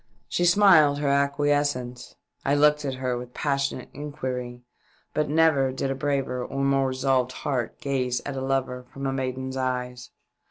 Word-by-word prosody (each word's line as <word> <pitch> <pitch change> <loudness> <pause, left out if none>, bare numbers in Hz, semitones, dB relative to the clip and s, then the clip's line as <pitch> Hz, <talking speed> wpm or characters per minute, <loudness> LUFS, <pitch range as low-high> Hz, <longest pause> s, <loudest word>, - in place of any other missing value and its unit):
She 175 - 0
smiled 175 -6 +6
her 145 0 -1
acquiescence. 140 -3 0 0.3
I 140 - +2
looked 150 0 +4
at 135 -2 -2
her 130 -1 -2
with 125 0 -10
passionate 140 -3 -1
inquiry, 130 -4 -5 0.5
but 150 -1 0
never 150 -4 +3
did 135 +1 -2
a - - +1
braver 135 -2 -1
and 135 +2 -2
more 135 -1 +2
resolved 130 -1 +1
heart 125 -5 -2
gaze 125 -3 -1
at 140 - -4
a 135 - -3
lover 130 -1 -1
from 135 0 -6
a 135 - 0
maiden's 130 0 -3
eyes. 125 -1 -3
135 Hz, 160 wpm, -25 LUFS, 125-145 Hz, 0.5 s, smiled